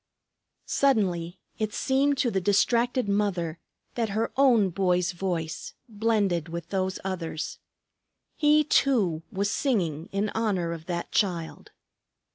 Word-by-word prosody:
Suddenly 190 -10 +1 0.2
it 215 -1 -2
seemed 275 +1 +2
to 245 -3 +1
the 190 - 0
distracted 235 +5 +2
mother 185 -5 0 0.3
that 230 -3 -1
her 225 - 0
own 235 -8 +4
boy's 180 -1 +1
voice 175 -3 -4
blended 205 -7 0
with 170 +1 -6
those 190 -1 -1
others. 170 -4 -4 0.8
He 300 0 +4
too 215 - +2
was 200 +1 -1
singing 175 - -1
in 200 +2 0
honor 200 -7 -1
of 165 -1 -9
that 170 -1 -3
Child. 175 -6 -1
195 Hz, 120 wpm, -27 LUFS, 175-230 Hz, 0.8 s, own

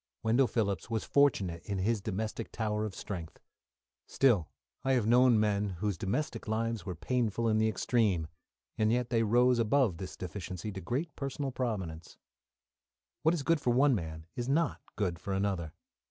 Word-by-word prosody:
Wendell 120 +4 +4
Phillips 100 -4 -1
was 115 -2 -1
fortunate 100 -12 +2
in 100 - -3
his 105 +3 0
domestic 110 +3 -3
tower 105 -1 -1
of 105 - -5
strength; 85 -6 -6 0.7
still, 115 - +3 0.3
I 135 - +2
have 120 -5 +2
known 120 0 +5
men 105 -2 +1
whose 100 +1 -1
domestic 110 - -2
lives 115 0 -1
were 90 - -3
painful 115 +3 0
in 110 -1 +3
the 110 0 +3
extreme, 105 -7 +1 0.5
and 110 0 +3
yet 120 0 0
they 115 -2 +3
arose 120 +3 +4
above 115 -4 +2
this 95 +1 -7
deficiency 90 +2 -5
to 95 -1 -6
great 145 - -3
personal 140 0 -3
prominence. 95 -11 -4 1.0
What 160 +2 +3
is 150 - -3
good 165 0 +2
for - - 0
one 135 +2 +5
man 80 -6 -4
is 120 +1 -3
not 160 +3 +1
good 90 -5 -1
for 95 +2 -4
another. 95 -5 -1
110 Hz, 170 wpm, -31 LUFS, 95-125 Hz, 1.0 s, known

